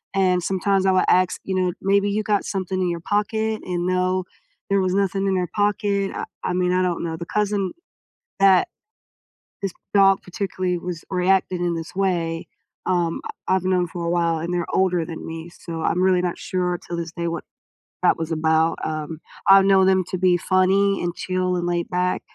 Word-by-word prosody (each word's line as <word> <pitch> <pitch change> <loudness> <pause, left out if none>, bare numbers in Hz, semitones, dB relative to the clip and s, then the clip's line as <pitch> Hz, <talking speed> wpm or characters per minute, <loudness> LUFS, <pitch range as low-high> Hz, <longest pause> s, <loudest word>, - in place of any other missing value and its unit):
and 185 -2 +3
sometimes 195 +1 +1
I 190 - +4
would 185 - +4
ask, 185 0 +3
you 190 - -3
know, 180 -2 +1
"Maybe 200 +1 +2
you 210 +1 0
got 205 -2 0
something 185 -1 -2
in 180 - +1
your 170 -1 -3
pocket" 220 +2 -1
and, 175 -1 -2
no, 185 0 +1 0.5
there 200 0 +3
was 185 0 0
nothing 195 0 +1
in 190 - +1
their 180 -1 0
pocket, 205 -1 +1
uh, - - -3 0.2
I 180 - 0
mean, 180 0 +1
I 185 - +2
don't 175 -2 -1
know 160 -1 -3
the 170 - -6
cousin 205 -1 -1 0.7
that 190 -2 +5 1.0
this 195 -3 -2 0.2
dog 195 -1 +5
particularly 185 -1 -2
was 170 -1 -6
reacting 185 -1 +1
in 170 -1 0
this 165 +2 -7
way, 170 -4 -1 0.4
um, 175 -2 0 0.3
I 185 - +4
I've 185 - -2
known 180 -1 +2
for 170 0 -5
a 170 - -1
while, 170 -1 +1
and 170 +2 -3
they're 175 -1 -1
older 180 -3 +2
than 165 -2 -7
me 165 +1 -7
so 165 -1 -7
I'm 180 +2 +1
really 185 -1 +4
not 175 -1 -1
sure 180 -1 -1
till 170 - -4
this 170 -1 -5
day 170 0 -3
what 170 -1 -4 0.6
that - - +5
was 165 0 -4
about, 160 +1 +2
um, 155 0 -4 0.3
I 195 0 +9
know 195 -1 +5
them 190 -1 +3
to 185 - -1
be 180 -1 +4
funny 195 +2 +2
and 175 0 -2
chill 185 0 -1
and 175 - -2
laid 175 -1 -1
back, 180 0 0
185 Hz, 200 wpm, -22 LUFS, 175-195 Hz, 1.0 s, I